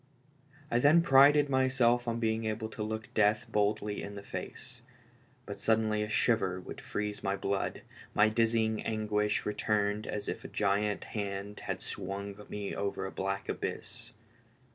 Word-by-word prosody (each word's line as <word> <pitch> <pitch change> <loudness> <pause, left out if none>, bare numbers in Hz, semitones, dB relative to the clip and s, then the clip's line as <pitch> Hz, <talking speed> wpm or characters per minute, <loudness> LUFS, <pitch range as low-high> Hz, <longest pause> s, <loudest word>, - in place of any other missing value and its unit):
I 120 - +3
then 155 +6 +6
prided 145 0 +7
myself 130 -3 +3
on 115 0 -1
being 110 -1 0
able 110 0 -2
to 110 - -7
look 110 +1 -4
death 105 0 +3
boldly 105 0 0
in 100 - -7
the 100 - -7
face; - - -7 0.6
but - - -7
suddenly 110 -1 +2
a 105 - -2
shiver 110 -5 +2
would 90 - -9
freeze 105 0 -3
my 100 0 0
blood, 100 0 -2 0.3
my 105 - +6
dizzy 110 0 +2
anguish 105 -1 0
returned 105 0 0
as 105 - -4
if - - -4
a - - -6
giant 105 0 0
hand 100 -1 -4
had - - -4
swung 100 +1 -5
me 105 -1 -4
over 100 -1 -2
a 95 - -4
black 95 0 -3
abyss. - - -5
105 Hz, 155 wpm, -31 LUFS, 100-115 Hz, 0.6 s, prided